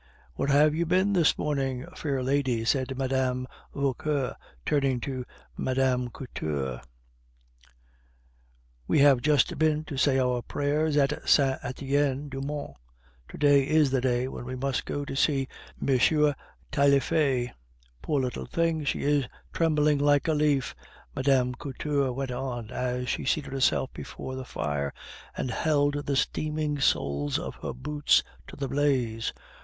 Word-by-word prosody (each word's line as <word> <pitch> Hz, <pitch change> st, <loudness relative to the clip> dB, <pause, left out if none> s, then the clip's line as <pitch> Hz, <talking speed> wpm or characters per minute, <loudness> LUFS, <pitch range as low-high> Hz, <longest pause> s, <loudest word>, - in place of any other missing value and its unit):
"Where 100 Hz, -, -2 dB
have 145 Hz, +2 st, +5 dB
you 170 Hz, +2 st, 0 dB
been 185 Hz, +4 st, +2 dB
this 170 Hz, -5 st, +3 dB
morning, 135 Hz, -3 st, -1 dB
fair 135 Hz, -4 st, -2 dB
lady?" 130 Hz, -4 st, 0 dB
said 130 Hz, +1 st, 0 dB
Mme. 130 Hz, -1 st, 0 dB, 0.3 s
Vauquer, 140 Hz, 0 st, -1 dB, 0.3 s
turning 135 Hz, -3 st, +1 dB
to 130 Hz, -1 st, -4 dB, 0.3 s
Mme. 130 Hz, -1 st, +1 dB
Couture. 70 Hz, -, -4 dB, 2.1 s
"We -, -, +2 dB
have 140 Hz, -3 st, +6 dB
just 145 Hz, -1 st, +2 dB
been 155 Hz, -1 st, +2 dB
to 150 Hz, -3 st, -7 dB
say 135 Hz, 0 st, +3 dB
our 125 Hz, -2 st, +1 dB
prayers 150 Hz, +4 st, 0 dB
at 145 Hz, +1 st, +1 dB
Saint 135 Hz, -2 st, +4 dB
Etienne 140 Hz, +2 st, -1 dB
du 135 Hz, 0 st, -5 dB
Mont. 145 Hz, -, -5 dB, 0.5 s
To -, -, -9 dB
day 145 Hz, -1 st, +5 dB
is 155 Hz, -3 st, +3 dB
the 130 Hz, -2 st, +1 dB
day 125 Hz, 0 st, +1 dB
when 130 Hz, -, -7 dB
we 130 Hz, +1 st, -5 dB
must 135 Hz, 0 st, -2 dB
go 145 Hz, 0 st, -3 dB
to 135 Hz, -, -5 dB
see 135 Hz, -1 st, +2 dB, 0.3 s
M. 145 Hz, +3 st, +3 dB, 0.4 s
Taillefer. 140 Hz, -3 st, +2 dB, 0.5 s
Poor 145 Hz, -3 st, 0 dB
little 125 Hz, -1 st, -3 dB
thing! 165 Hz, -2 st, 0 dB
She 140 Hz, -, -1 dB
is 145 Hz, -2 st, +2 dB, 0.3 s
trembling 150 Hz, -3 st, +2 dB
like 145 Hz, +1 st, +3 dB
a 160 Hz, -, +3 dB
leaf," 145 Hz, -4 st, +1 dB, 0.4 s
Mme. 130 Hz, -2 st, +2 dB
Couture 140 Hz, 0 st, -1 dB
went 135 Hz, +1 st, -3 dB
on, 125 Hz, -3 st, -4 dB
as 125 Hz, 0 st, -2 dB
she -, -, -1 dB
seated 135 Hz, 0 st, -1 dB
herself 135 Hz, -1 st, +1 dB
before 130 Hz, -, -7 dB
the 130 Hz, 0 st, -5 dB
fire 75 Hz, -, -3 dB, 0.4 s
and 125 Hz, -, -2 dB
held 145 Hz, -2 st, +1 dB
the 140 Hz, -, +1 dB
steaming 150 Hz, +1 st, -1 dB
soles 70 Hz, -, +1 dB
of -, -, -5 dB
her -, -, -4 dB
boots 145 Hz, +3 st, +2 dB, 0.2 s
to -, -, -10 dB
the 140 Hz, -1 st, -3 dB
blaze. 130 Hz, -5 st, 0 dB
135 Hz, 145 wpm, -27 LUFS, 130-145 Hz, 2.1 s, have